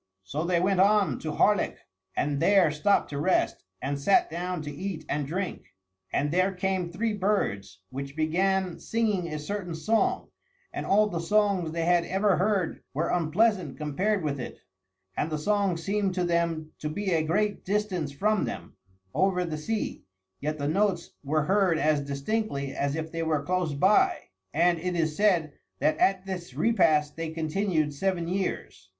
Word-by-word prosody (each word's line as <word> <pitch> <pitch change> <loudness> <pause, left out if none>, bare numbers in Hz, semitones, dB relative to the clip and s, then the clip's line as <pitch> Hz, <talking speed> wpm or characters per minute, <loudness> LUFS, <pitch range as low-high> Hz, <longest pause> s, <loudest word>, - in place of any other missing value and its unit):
So 145 +12 -3
they 175 -1 +2
went 190 +1 +2
on 195 - +4
to 155 - -4
Harlech 205 +5 +2 0.4
and 145 -1 0
there 195 -4 +4
stopped 155 +6 +1
to 140 - -3
rest, 185 +5 +1 0.2
and 140 +1 -2
sat 190 +5 +3
down 175 0 -3
to 145 - -5
eat 165 0 -5
and 145 -1 -1
drink. 180 - -4 0.4
And 145 0 0
there 185 +3 +2
came 185 -1 -1
three 215 +6 -1
birds, 100 - -1
which 140 +2 -6
began 180 +2 +1
singing 210 -4 0
a 155 -2 -4
certain 175 +2 -4
song, 220 +8 +1 0.4
and - - -4
all 210 +2 +5
the 175 -5 -3
songs 195 -2 +1
they 165 0 -1
had 175 0 +4
ever 195 +1 +2
heard 190 -2 0
were 155 - 0
unpleasant 180 -1 +1
compared 180 +7 0
with 140 -2 -2
it; 125 - -6 0.6
and 160 - -1
the 155 - -2
songs 190 0 0
seemed 200 -1 0
to 180 - 0
them 170 -2 0
to 150 - -3
be 190 +4 -1
at 160 - +3
a 155 - -4
great 205 +5 0
distance 190 -7 -1
from 205 +4 +1
them, 85 -7 -7 0.4
over 185 -1 +2
the 160 -2 -3
sea, 210 +8 -3 0.4
yet 150 +1 -2
the 145 -1 -2
notes 185 +1 +1
were 150 +2 +1
heard 190 -1 +3
as 150 -1 +2
distinctly 140 +1 -2
as 140 +1 -1
if 160 0 -4
they 165 - -3
were 155 -3 0
close 180 -2 -1
by; 190 +8 +4 0.3
and 170 +2 +3
it 180 +1 -2
is 160 -2 0
said 175 -7 +2 0.2
that 155 - +2
at 190 -1 +2
this 180 -8 -6
repast 155 -5 +3
they 165 -1 -4
continued 160 -1 0
seven 175 +2 -1
years. 170 - -3
170 Hz, 175 wpm, -27 LUFS, 155-195 Hz, 0.6 s, all